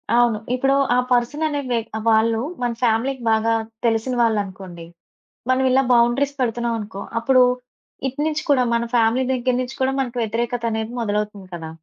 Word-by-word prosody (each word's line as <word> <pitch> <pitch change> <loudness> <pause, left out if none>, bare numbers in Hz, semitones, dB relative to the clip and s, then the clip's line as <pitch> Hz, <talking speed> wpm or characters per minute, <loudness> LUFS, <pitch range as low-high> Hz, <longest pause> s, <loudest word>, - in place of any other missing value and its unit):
అవును. 240 -3 +3 0.2
ఇప్పుడు 270 +2 +2 0.2
ఆ - - +3
పర్సన్ 245 +6 +1
అనే 290 -2 -2
వ్య 240 -1 +1 0.3
వాళ్ళు 225 0 +3 0.2
మన 240 -1 0
ఫ్యామిలీకి 245 +3 +1
బాగా 225 +1 +2 0.3
తెలిసిన 225 +2 +1
వాళ్ళనుకోండి 190 -6 -2 0.6
మనం 255 +1 +3
ఇలా 265 +1 +4
బౌండరీస్ 245 +4 +2
పెడుతున్నాం 235 -1 0
అనుకో, 205 -2 -7 0.2
అప్పుడు 255 +2 +4 0.6
ఇటు 265 +2 -7
నుంచి 315 0 -2
కూడా 265 -3 +4
మన 235 0 +1
ఫ్యామిలీ 235 +2 +3
దెగ్గర 255 0 0
నుంచి 255 +2 -6
కూడా 265 +1 +2
మనకు 245 -2 -4
వ్యతిరేకతనేది 230 0 -2
మొదలవుతుంది 210 -2 -3
కదా! 160 -1 -7
235 Hz, 150 wpm, -21 LUFS, 220-255 Hz, 0.6 s, ఇలా